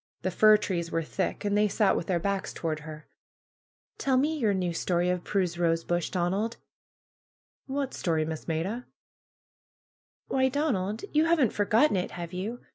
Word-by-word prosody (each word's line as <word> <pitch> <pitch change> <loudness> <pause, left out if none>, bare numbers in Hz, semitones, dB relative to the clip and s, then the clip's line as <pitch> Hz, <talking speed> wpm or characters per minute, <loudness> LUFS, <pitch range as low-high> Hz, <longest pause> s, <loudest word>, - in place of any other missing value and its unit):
The 185 - 0
fir 215 +3 +6
trees 175 -5 -2
were 165 0 -1
thick, 190 +5 -3
and 205 0 +1
they 210 0 +4
sat 205 0 +2
with 170 - -3
their 180 -2 +1
backs 200 +2 -2
toward 155 -2 -3
her. 155 0 -9 0.9
^^Tell 260 -2 +2
me 305 +4 +1
your 230 -9 +1
new 180 -2 -1
story 175 +1 +1
of 180 -1 -2
Prue's 180 -4 -1
rosebush, 170 0 0
Don 175 -1 0
ald 225 +4 -2 1.1
1'^ 265 - -3
'^What 280 -2 -2
story. 160 -3 0
Miss 160 -1 -6
Maida 185 +10 -2 1.4
?'^ - - -13
''^Why, 265 0 +3
Donald, 225 -9 -1
you 305 +1 +4
haven't 320 -9 +3
forgotten 215 +3 +3
it, 180 - -1
have 170 0 -6
you? 210 +7 -4
190 Hz, 175 wpm, -28 LUFS, 170-225 Hz, 1.4 s, fir